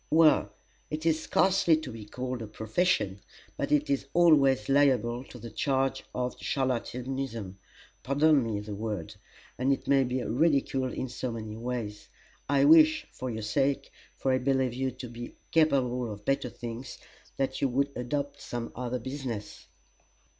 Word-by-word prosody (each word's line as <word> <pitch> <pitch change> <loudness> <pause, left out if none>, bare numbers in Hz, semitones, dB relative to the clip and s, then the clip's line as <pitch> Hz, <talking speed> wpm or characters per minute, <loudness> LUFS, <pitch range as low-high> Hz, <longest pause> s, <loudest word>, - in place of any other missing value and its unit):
"Well 160 -1 +5 0.4
it 155 +1 -4
is 160 -1 +2
scarcely 185 -2 +3
to 155 -5 -6
be 110 -2 -8
called 125 +2 -4
a 110 - -5
'profession,' 110 - 0 0.4
but - - -3
it 150 0 +3
is 140 -1 -1
always 140 -9 +5
liable 130 -4 +3
to 125 - -11
the 115 -1 -9
charge 135 +2 0
of 125 0 -2
charlatanism: 125 -5 -3 0.4
pardon 145 +2 +4
me 110 -3 -2
the 105 0 -6
word. 105 -5 -4 0.5
And 130 +2 +2
it 135 - -1
may 135 -1 +5
be 125 0 -2
ridiculed 135 -1 +1
in 130 - -3
so 125 0 -4
many 110 -2 -6
ways. 115 -3 -5 0.4
I 140 -1 +4
wish, 155 +1 +6
for 130 +1 -5
your 110 -2 -4
sake 135 +6 0 0.3
for 135 - 0
I 130 - +2
believe 130 -2 +1
you 130 +1 -1
to 130 0 -8
be 120 +1 -8 0.2
capable 125 -7 +2
of 105 0 -9
better 135 -2 0
things 120 +2 -7 0.4
that 135 -1 -1
you 140 - +3
would 140 +3 +1
adopt 140 +3 -3
some 120 -1 -5
other 125 0 -2
business." 125 -4 -6
130 Hz, 160 wpm, -29 LUFS, 120-140 Hz, 0.5 s, wish